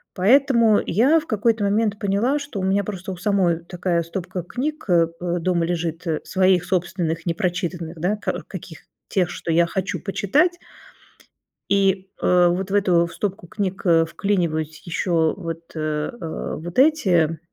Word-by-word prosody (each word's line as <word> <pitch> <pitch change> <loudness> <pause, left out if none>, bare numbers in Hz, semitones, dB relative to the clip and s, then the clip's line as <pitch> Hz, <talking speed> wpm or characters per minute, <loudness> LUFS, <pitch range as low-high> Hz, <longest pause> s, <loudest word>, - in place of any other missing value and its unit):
Поэтому 235 +1 +4
я 265 - +3
в 320 - -11
какой-то 220 0 +1
момент 210 +1 +1
поняла, 220 +8 +1
что 285 -8 -6
у - - -3
меня 195 +2 +2
просто 190 -1 -6
у 185 - -6
самой 180 -3 +1
такая 175 0 -1
стопка 180 +2 -5
книг, 275 - -4
э, 170 -2 +4
э, 175 0 -1
дома 170 0 +1
лежит, 170 0 -3
э, 155 -2 -1
своих 185 -2 +2
собственных 175 -2 -2
непрочитанных, 175 -1 -2
да, 180 +6 +1
ка 210 - -3
каких - - -9 0.3
тех, 180 -4 +1
что 170 - -4
я 170 +1 +4
хочу 190 +2 -3
почитать, 295 - +1 1.1
и, 195 -1 +2
э, 180 -1 +4
вот 185 +2 -1
в - - -2
эту 180 -4 +3
в 170 - -9
стопку 195 -3 -4
книг, 190 0 -3
э, 165 -2 +5
вклиниваюсь 165 -4 -1
еще 165 -2 +1
вот, 165 -3 -6
а, 155 +4 -3
вот 175 +7 -4
эти, 185 - +3
185 Hz, 160 wpm, -22 LUFS, 170-205 Hz, 1.1 s, э